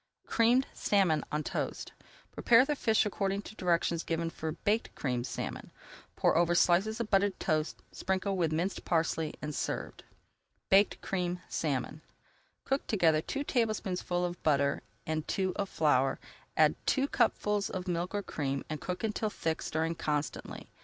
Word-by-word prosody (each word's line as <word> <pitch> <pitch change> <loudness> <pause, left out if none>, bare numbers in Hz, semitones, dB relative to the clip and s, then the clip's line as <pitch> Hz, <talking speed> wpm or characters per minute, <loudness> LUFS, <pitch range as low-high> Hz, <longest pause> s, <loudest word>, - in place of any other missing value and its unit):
CREAMED 240 +3 +3
SALMON 180 -7 +2
ON 150 0 -1
TOAST - - -3 0.4
Prepare 240 +2 +5
the 295 - 0
fish 220 -5 +2
according 200 -1 -1
to 215 - -10
directions 170 -3 +1
given 165 0 -2
for 160 -1 -4
Baked 210 +6 -1
Creamed 125 -3 -2
Salmon. - - -5 0.5
Pour - - +2
over 175 +1 +3
slices 195 +7 +3
of 230 -2 -3
buttered 195 -1 +2
toast, 155 0 -1
sprinkle 190 +1 -1
with 170 -4 +1
minced 175 +5 -1
parsley, 160 -2 0
and 150 0 -3
serve. - - -3 0.8
BAKED 195 +2 +4
CREAMED 180 -1 -2
SALMON 145 0 -2 0.6
Cook 270 +1 -1
together 165 -7 +3
two 280 - -3
tablespoonfuls 195 -8 0
of 175 - -12
butter 140 -2 +2 0.2
and 155 -1 -2
two 190 -1 0
of 200 -1 -2
flour, 135 -4 +2 0.4
add - - +6
two 275 0 +2
cupfuls 210 -6 +1
of 185 0 -5
milk 175 +2 -2
or 205 - -1
cream, 140 -5 -3
and 155 - -4
cook 180 +2 -4
until 215 0 0
thick, 160 -5 -2
stirring 160 +1 -1
constantly. 150 -2 -3
180 Hz, 155 wpm, -31 LUFS, 155-205 Hz, 0.8 s, add